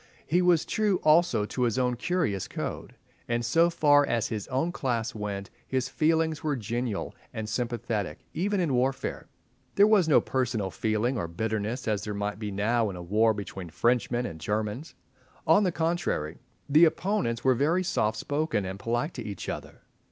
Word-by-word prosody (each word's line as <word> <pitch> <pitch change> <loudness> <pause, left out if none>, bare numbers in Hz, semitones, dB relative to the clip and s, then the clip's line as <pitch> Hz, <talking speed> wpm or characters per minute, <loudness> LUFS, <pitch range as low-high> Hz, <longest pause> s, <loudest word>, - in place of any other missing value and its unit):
He 175 +4 +2
was 175 -3 +3
true 210 -3 +1
also 155 -9 +4
to 125 - -4
his 120 -1 +1
own 125 -1 +1
curious 125 - -1
code, - - -5 0.3
and, 120 0 0
so 165 +8 +4
far 145 -3 +4
as 120 -5 0
his 105 -3 -4
own 135 +7 0
class 120 -8 -2
went, 100 -3 -5 0.2
his 130 -1 -1
feelings 160 +1 +1
were 150 -2 0
genial 120 -1 -3 0.2
and 110 -1 -5
sympathetic, 115 -3 -2 0.2
even 200 +5 0
in 165 -7 +1
warfare. 130 +2 -1 0.5
There 200 - +7
was 210 -5 +4
no 150 - +7
personal 115 -7 -1
feeling 110 +7 0
or 85 - -2
bitterness 110 +7 -3
as 105 -2 0
there 105 -1 -4
might 105 +1 -3
be 105 -2 -3
now 110 +3 +1
in 95 - -6
a 90 - -7
war 110 +5 +3
between 95 -3 -6
Frenchmen 120 +6 +1
and 80 -8 -6
Germans. 105 - -3 0.5
On 205 - +5
the 185 -3 +2
contrary, 160 - -1 0.3
the 155 +4 +7
opponents 165 - 0
were 130 - +5
very 160 +9 +1
softspoken 110 - -1
and 95 +1 -6
polite 120 - -1
to 120 - -6
each 100 -4 -6
other. - - -7
120 Hz, 175 wpm, -28 LUFS, 105-155 Hz, 0.5 s, There